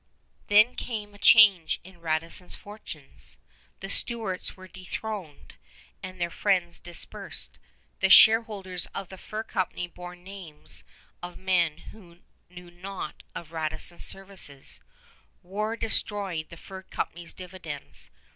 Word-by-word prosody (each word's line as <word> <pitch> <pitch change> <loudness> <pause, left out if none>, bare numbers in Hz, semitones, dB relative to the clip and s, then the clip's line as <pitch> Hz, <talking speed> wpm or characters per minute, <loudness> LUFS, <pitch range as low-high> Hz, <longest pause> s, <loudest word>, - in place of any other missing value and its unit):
Then 215 +4 +7
came 210 -5 -4
a 205 - -15
change 200 -7 +7
in 185 0 -14
Radisson's 165 +2 0
fortunes. 200 -9 -6 0.4
The 195 - -4
Stuarts 210 -4 -2
were 185 0 -11
dethroned 185 -2 -6 0.5
and 185 0 -7
their 170 0 0
friends 180 -3 +1
dispersed. 175 -1 -3 0.4
The - - +3
shareholders 210 -5 +7
of 195 -2 -4
the 190 - -10
fur 215 +1 -4
company 185 -4 -1
bore 180 0 -9
names 180 -4 -8 0.4
of 175 0 -7
men 175 -5 +2 0.2
who 175 -5 -16 0.3
knew 180 -1 -11
naught 180 -2 -6
of 165 -2 -7
Radisson's 160 +1 -1
services. 190 -8 -2 0.6
War 210 +5 -2
destroyed 200 -7 0
the 170 - -10
fur 190 +2 -9
company's 175 -2 -4
dividends. 180 -6 -1
185 Hz, 120 wpm, -28 LUFS, 170-200 Hz, 0.6 s, Then